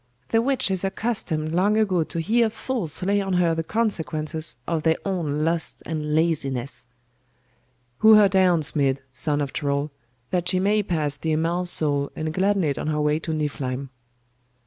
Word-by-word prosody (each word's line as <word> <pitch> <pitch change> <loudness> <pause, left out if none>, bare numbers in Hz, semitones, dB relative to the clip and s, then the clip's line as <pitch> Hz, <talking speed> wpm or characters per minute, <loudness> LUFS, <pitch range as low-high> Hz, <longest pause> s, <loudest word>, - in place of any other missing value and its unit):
'The 225 - +3
witch 260 -5 0
is 190 -1 -1
accustomed 195 -6 -2
long 200 +5 +2
ago 190 -6 +2
to 165 - -5
hear 225 +7 +2
fools 220 - -3
lay 200 +2 +1
on 195 -1 -2
her 175 -2 +2
the 165 0 -2
consequences 160 - -2
of 165 -2 -1
their 160 +1 +2
own 155 -6 -1
lust 165 0 -2
and 150 -1 -3
laziness.' 135 -6 -1 1.1
'Hew 220 0 +8
her 210 -1 +7
down, 185 -3 +3
Smid, 140 -2 +2 0.2
son 145 +2 +2
of 140 -2 -4
Troll, 145 0 -1 0.4
that 180 -1 0
she 185 - +1
may 205 +3 +2
pass 155 -7 -2
the 160 +2 -2
Amal's 170 +3 0
soul 145 -4 +3
and 155 0 -3
gladden 195 +2 +1
it 145 -3 -1
on - - -4
her 155 -1 -1
way 150 +1 +1
to 160 - -5
Niflheim. 140 -4 -3
165 Hz, 170 wpm, -23 LUFS, 150-190 Hz, 1.1 s, Hew